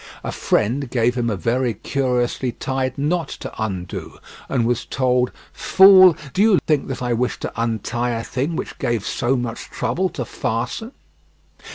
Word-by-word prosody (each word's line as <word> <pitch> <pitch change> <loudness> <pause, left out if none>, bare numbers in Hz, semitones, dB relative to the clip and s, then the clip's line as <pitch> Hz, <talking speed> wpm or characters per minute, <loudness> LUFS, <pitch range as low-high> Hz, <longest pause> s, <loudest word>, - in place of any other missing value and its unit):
A - - -3
friend 125 +5 0
gave 120 0 +2
him 120 -2 -1
a 105 - -1
very 120 +5 0
curiously 125 -2 -1
tied 130 -1 -2
knot 160 +4 0
to - - -6
undo 95 -4 -5 0.3
and 125 -4 +1
was 120 -1 0
told: 125 -1 +1 0.2
"Fool, 185 0 +7 0.2
do 195 - +1
you 210 -3 +5
think 150 -3 +1
that 130 -2 -4
I 120 -1 0
wish 125 +2 -1
to - - -4
untie 115 +1 -1
a 115 -1 -2
thing 140 +8 -2
which - - -5
gave 115 -4 -1
so 125 +3 0
much 120 -2 -5
trouble 165 +11 -1
to 140 -9 -5
fasten." 125 - -3
125 Hz, 165 wpm, -21 LUFS, 120-140 Hz, 0.3 s, Fool